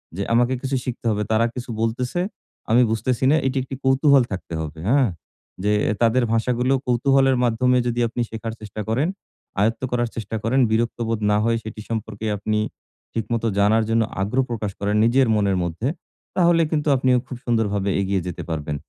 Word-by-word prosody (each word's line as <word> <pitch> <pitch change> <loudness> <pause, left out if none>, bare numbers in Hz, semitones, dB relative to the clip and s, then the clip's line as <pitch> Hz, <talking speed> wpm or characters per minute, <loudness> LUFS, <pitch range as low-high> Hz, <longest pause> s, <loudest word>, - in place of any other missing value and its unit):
যে, 100 - -2
"আমাকে 120 +2 +3
কিছু 135 0 -2
শিখতে 125 -1 -5
হবে। 105 0 0
তারা 110 +1 +3
কিছু 125 -1 -6
বলতেছে, 125 +8 -1 0.5
আমি 120 - +6
বুঝতেছি 115 +3 -1
না।" 155 - +5
এটি 135 +1 -1
একটি 135 +1 -6
কৌতূহল 135 0 +5
থাকতে 95 -3 -5
হবে, 80 0 -6
হ্যাঁ? 130 -3 +4 0.5
যে 105 - +2 0.3
তাদের 120 +2 +3
ভাষাগুলো 125 +3 +1
কৌতূহলের 135 +1 +3
মাধ্যমে 125 +2 +2
যদি 120 0 -1
আপনি 120 +1 -3
শেখার 110 0 -5
চেষ্টা 105 0 -6
করেন, 130 +9 +1 0.5
আয়ত্ত 115 +2 +1
করার 120 -1 0
চেষ্টা 110 -1 -4
করেন, 125 +4 +2
বিরক্ত 115 +1 0
বোধ 115 -1 -1
না 105 - +3
হয়ে 115 0 +2
সেটি 110 0 -7
সম্পর্কে 110 -1 -4
আপনি 105 +1 -1 0.5
ঠিকমত 115 +1 -2 0.2
জানার 110 +2 +4
জন্য 115 0 +3 0.2
আগ্রহ 125 +7 +1
প্রকাশ 105 -3 -2
করেন, 100 +1 0
নিজের 130 +2 +4
মনের 100 -3 +1
মধ্যে। 85 +8 -3 0.5
তাহলে 170 -1 +4
কিন্তু 150 -1 0
আপনিও 130 -1 +3
খুব 125 - -6
সুন্দরভাবে 105 -4 0
এগিয়ে 95 -1 0
যেতে 90 - -5
পারবেন। 75 -2 -3
115 Hz, 175 wpm, -22 LUFS, 105-125 Hz, 0.5 s, আমি